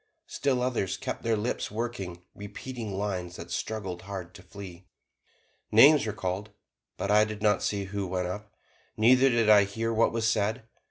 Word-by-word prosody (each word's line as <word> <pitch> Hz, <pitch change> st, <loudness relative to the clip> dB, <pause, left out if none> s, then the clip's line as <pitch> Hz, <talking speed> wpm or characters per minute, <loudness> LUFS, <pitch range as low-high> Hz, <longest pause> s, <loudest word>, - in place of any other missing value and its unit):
Still 130 Hz, -3 st, 0 dB
others 120 Hz, -7 st, -1 dB
kept -, -, -5 dB
their 115 Hz, -1 st, +1 dB
lips 110 Hz, +4 st, -2 dB
working, 100 Hz, -6 st, -5 dB
repeating 105 Hz, 0 st, -7 dB
lines 90 Hz, -3 st, -3 dB
that 85 Hz, 0 st, -9 dB
struggled 95 Hz, -5 st, -4 dB
hard 95 Hz, -3 st, -7 dB
to 95 Hz, -, -12 dB
flee. 90 Hz, -1 st, -11 dB, 0.8 s
Names 135 Hz, +4 st, +7 dB
were -, -, 0 dB
called, 95 Hz, +2 st, -4 dB, 0.5 s
but 100 Hz, -, -2 dB
I 105 Hz, +1 st, +6 dB
did 110 Hz, -1 st, -5 dB
not 105 Hz, -2 st, +3 dB
see 100 Hz, -1 st, -1 dB
who 100 Hz, 0 st, -4 dB
went 90 Hz, 0 st, -2 dB
up, 105 Hz, +3 st, -6 dB, 0.5 s
neither 130 Hz, +4 st, +5 dB
did 115 Hz, -3 st, +2 dB
I 105 Hz, -1 st, +7 dB
hear 115 Hz, +3 st, -2 dB
what 115 Hz, +1 st, +3 dB
was 115 Hz, -1 st, 0 dB
said. 110 Hz, +2 st, 0 dB
105 Hz, 170 wpm, -28 LUFS, 95-115 Hz, 0.8 s, Names